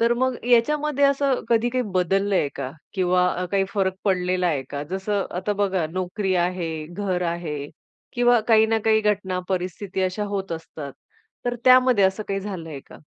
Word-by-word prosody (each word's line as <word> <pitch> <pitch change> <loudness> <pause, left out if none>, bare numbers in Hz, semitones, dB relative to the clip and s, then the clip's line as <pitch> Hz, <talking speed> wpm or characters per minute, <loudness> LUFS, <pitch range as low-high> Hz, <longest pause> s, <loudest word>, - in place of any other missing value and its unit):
तर 230 +1 +4
मग 260 +1 0
याच्यामध्ये 285 +4 +3
असं 275 -1 +2
कधी 235 0 +3
काही 255 +1 0
बदललंय 190 -1 +1
का? 130 -2 -4 0.2
किंवा 180 -1 +1
काही 195 -1 +3
फरक 190 -2 +1
पडलेला 180 -2 +1
आहे 150 -6 0
का? 140 0 -4
जसं 195 +1 -1
आता 195 +3 -1
बघा, 195 -4 0
नोकरी 185 +2 -1
आहे, 175 -3 -1
घर 180 +1 -2
आहे 165 -4 -4 0.5
किंवा 240 -1 +4
काही 220 -1 +6
ना 225 0 +1
काही 220 -1 +4
घटना 200 -3 0
परिस्थिती 185 +1 -3
अशा 185 +3 -1
होत 195 -3 -3
असतात 160 -3 -7 0.5
तर 245 0 0
त्यामध्ये 255 -4 +6
असं 190 +3 +1
काही 195 0 -1
झालंय 165 -8 -6
का? - - -13
195 Hz, 165 wpm, -23 LUFS, 180-225 Hz, 0.5 s, काही